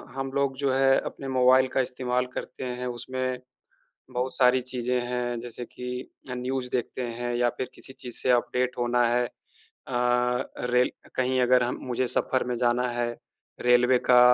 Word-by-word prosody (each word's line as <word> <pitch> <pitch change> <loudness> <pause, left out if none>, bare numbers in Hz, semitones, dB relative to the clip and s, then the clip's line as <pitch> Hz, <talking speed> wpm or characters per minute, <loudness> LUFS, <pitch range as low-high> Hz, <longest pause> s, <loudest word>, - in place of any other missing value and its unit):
हम 135 0 -3
लोग 140 -1 +1
जो 140 -1 +1
है 135 0 +5
अपने 135 - -6
मोबाइल 130 0 +5
का 135 - +3
इस्तेमाल 125 0 -1
करते 130 - -6 0.2
हैं। 125 - -3
उसमें 130 +1 -3 0.7
बहुत 125 +1 -2
सारी 125 0 +5
चीज़ें 125 0 0
हैं 120 -1 -2
जैसे 120 0 -7
कि 125 +1 -7 0.4
अ, - - -2
न्यूज़ 125 0 -2
देखते 125 +1 -2 0.2
हैं 120 0 -1
या 120 0 +3
फ़िर 130 - -4
किसी 130 - -12
चीज़ 125 -3 -10
से - - +1
अपडेट 125 +1 -2
होना 120 0 +2
है। 120 +1 +2
अ, - - -12 1.4
रेल 125 0 +4 0.2
कहीं 130 0 +1
अगर 125 0 +5
हम 125 +1 -1
मुझे 125 +1 +1
सफर 130 +1 +1
में 125 -1 -1
जाना 120 +1 +2
है, 120 0 -1 0.5
रेलवे 125 +1 +5
का 125 -1 +8
125 Hz, 170 wpm, -27 LUFS, 120-130 Hz, 1.4 s, का